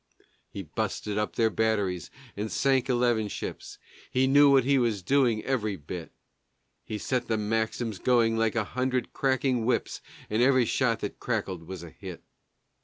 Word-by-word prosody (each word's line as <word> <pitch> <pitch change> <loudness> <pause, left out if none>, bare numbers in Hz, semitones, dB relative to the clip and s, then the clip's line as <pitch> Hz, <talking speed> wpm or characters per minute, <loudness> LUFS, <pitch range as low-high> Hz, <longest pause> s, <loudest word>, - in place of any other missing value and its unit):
He 100 - -6
busted 105 +5 -3
up 105 - -2
their 115 -1 +2
batteries 105 -5 0 0.3
and 105 +2 -4
sank 135 -1 +2
eleven 120 -3 +2
ships - - -6 0.3
(He 130 +1 +2
knew 140 +2 +6
what 135 -2 +5
he 135 +1 +3
was 110 -6 0
doing, 125 -3 +2
every 110 -6 0
bit); 80 +1 -8 0.7
He 110 - -5
set 125 +2 -2
the 110 - 0
Maxims 110 0 -1
going 115 -1 +3
like 115 0 +1
a 115 - +2
hundred 130 +3 -2
cracking 130 -3 +1
whips, 125 +2 -1 0.3
And 110 +2 0
every 130 -1 +4
shot 115 -2 +1
that 105 - -5
crackled 95 -8 -3
was 95 -2 -7
a 85 - -10
hit. - - -9
115 Hz, 165 wpm, -28 LUFS, 105-130 Hz, 0.7 s, knew